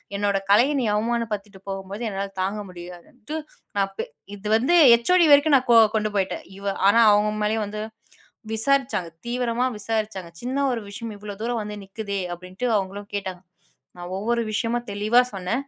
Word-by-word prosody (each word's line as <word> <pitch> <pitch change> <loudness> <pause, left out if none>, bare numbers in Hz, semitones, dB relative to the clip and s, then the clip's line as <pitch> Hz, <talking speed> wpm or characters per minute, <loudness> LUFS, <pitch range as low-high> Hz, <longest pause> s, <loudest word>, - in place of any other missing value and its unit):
என்னோட 200 0 +1
கலைய 240 +8 +5
நீ - - 0
அவமான 230 +2 0
படுத்திட்டு 200 -1 -7
போம்போது 195 +4 -5
என்னால 195 0 -4
தாங்க 195 +3 -1
முடியாதுன்ட்டு. 180 - -9 0.4
நான் 195 -1 +1
ப் - - -3 0.3
இது 205 +1 -8
வந்து 260 +9 +1 0.2
ஹேச்ஓடி 340 +9 +4
வரைக்கும் 285 +1 +6
நான் 255 - -3
கொ 230 - +8 0.2
கொண்டு 215 0 -1
போயிட்டேன் 190 -1 -1
இவ 200 - -10 0.2
ஆனா 230 +3 +5
அவங்க 210 +1 +3
மேலயும் 215 0 0
வந்து 210 +1 -5 0.7
விசாரிச்சாங்க, 240 -4 +1 0.2
தீவிரமா 240 0 0
விசாரிச்சாங்க. 210 -4 -3
சின்ன 255 +3 -3
ஒரு 230 -2 -2
விஷயம், 225 +2 -6
இவ்வளோ 205 0 -8
தூரம் 235 0 -1
வந்து 210 0 -6
நிக்குதே, 200 0 -5
அப்டின்ட்டு 185 +6 -7
அவங்களும் 200 +1 -3
கேட்டாங்க. 190 -3 -4 0.6
நான் 175 0 -8
ஒவ்வொரு 235 +4 0
விஷயமும் 235 +3 -1
தெளிவா 210 +4 +3
சொன்னே. 185 +2 -3
210 Hz, 160 wpm, -24 LUFS, 195-235 Hz, 0.7 s, கொ